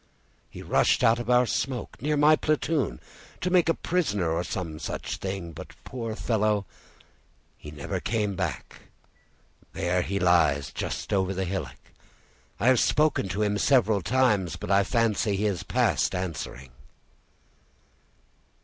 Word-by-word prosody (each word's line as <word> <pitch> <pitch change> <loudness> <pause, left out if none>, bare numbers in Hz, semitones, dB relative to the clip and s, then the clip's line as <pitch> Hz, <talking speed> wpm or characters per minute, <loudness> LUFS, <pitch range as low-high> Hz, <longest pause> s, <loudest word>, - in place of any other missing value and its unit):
He - - -10
rushed - - +2
out 115 +1 +4
of 120 0 -5
our 125 0 +5
smoke, 125 -1 -3
near 150 +2 0
my 150 +2 +6
platoon, 150 - -1 0.4
to 180 - -2
make 175 -2 +4
a 165 - +3
prisoner 105 - 0
or 85 +2 0
some 85 -4 -5
such - - -4
thing, 95 -3 -5
but, - - -10
poor 115 -3 -5
fellow, 105 -3 0 0.9
he 75 - -11
never 75 -1 -4
came 105 -4 -1
back; 85 -7 -4 1.0
there 90 +1 0
he 100 +2 -2
lies 80 -7 +3
just - - -4
over 95 -1 +1
the 95 0 -1
hillock. 85 -8 -4 0.8
I 115 - -1
have 130 -1 +5
spoken 150 -10 +2
to 100 +5 -1
him 105 -1 0
several 110 -5 +3
times, 105 -6 +1
but - - -5
I 100 0 +5
fancy 110 -2 +1
he 100 +2 -1
is 100 -4 -1
past - - +1
answering." 70 -8 -5
100 Hz, 145 wpm, -26 LUFS, 90-120 Hz, 1.0 s, my